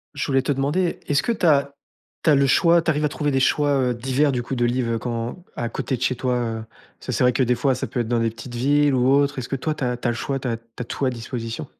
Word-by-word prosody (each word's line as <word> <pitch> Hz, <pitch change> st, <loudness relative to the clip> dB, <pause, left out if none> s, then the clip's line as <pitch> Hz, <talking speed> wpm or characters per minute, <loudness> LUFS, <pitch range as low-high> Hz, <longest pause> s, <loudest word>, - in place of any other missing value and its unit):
Je -, -, -2 dB
voulais 135 Hz, -1 st, +2 dB
te 140 Hz, +2 st, 0 dB
demander, 150 Hz, +7 st, -1 dB
est-ce 140 Hz, -1 st, +2 dB
que 235 Hz, -, 0 dB
tu 180 Hz, -, -2 dB
as 140 Hz, -3 st, +3 dB, 0.5 s
tu 155 Hz, -, +4 dB
as -, -, +6 dB
le 140 Hz, 0 st, +3 dB
choix, 170 Hz, +4 st, +4 dB
tu 165 Hz, -, -2 dB
arrives 150 Hz, 0 st, +1 dB
à -, -, +1 dB
trouver 150 Hz, 0 st, -2 dB
des 135 Hz, -2 st, +1 dB
choix, 145 Hz, +1 st, +2 dB
heu, 125 Hz, -1 st, +1 dB
divers, 135 Hz, +4 st, +1 dB
du 125 Hz, -, -1 dB
coup, 125 Hz, +2 st, -4 dB
de 120 Hz, 0 st, +1 dB
livres 120 Hz, -1 st, 0 dB
quand 120 Hz, +7 st, -4 dB
à 120 Hz, -, -3 dB
côté 130 Hz, +2 st, -2 dB
de -, -, -15 dB
chez 130 Hz, 0 st, +1 dB
toi, 125 Hz, +1 st, -1 dB
heu? 115 Hz, -2 st, -1 dB, 0.5 s
Parce -, -, -15 dB
que -, -, -1 dB
c'est -, -, +1 dB
vrai 125 Hz, 0 st, +4 dB
que 130 Hz, -, +2 dB
des 125 Hz, 0 st, +2 dB
fois, 130 Hz, +2 st, +1 dB
ça 125 Hz, -, -3 dB
peut 125 Hz, -, -4 dB
être 120 Hz, -, -1 dB
dans 120 Hz, 0 st, +1 dB
des 115 Hz, -1 st, +1 dB
petites 120 Hz, +2 st, -9 dB
villes 145 Hz, +2 st, +3 dB
ou 125 Hz, 0 st, +2 dB
autres, 140 Hz, 0 st, +2 dB
est-ce 125 Hz, -, -4 dB
que 135 Hz, -, -1 dB
toi, 155 Hz, +3 st, -2 dB
tu 140 Hz, -, -5 dB
as 125 Hz, 0 st, 0 dB
tu 120 Hz, -, -3 dB
as 120 Hz, -, +2 dB
le -, -, -4 dB
choix, 135 Hz, +2 st, -2 dB
tu 130 Hz, -, -4 dB
as 115 Hz, -2 st, -1 dB
tu 115 Hz, -, -26 dB, 0.2 s
as 125 Hz, -, -2 dB
tout 135 Hz, -, -3 dB
à -, -, +3 dB
disposition? 115 Hz, -1 st, -5 dB
130 Hz, 320 wpm, -22 LUFS, 120-145 Hz, 0.5 s, as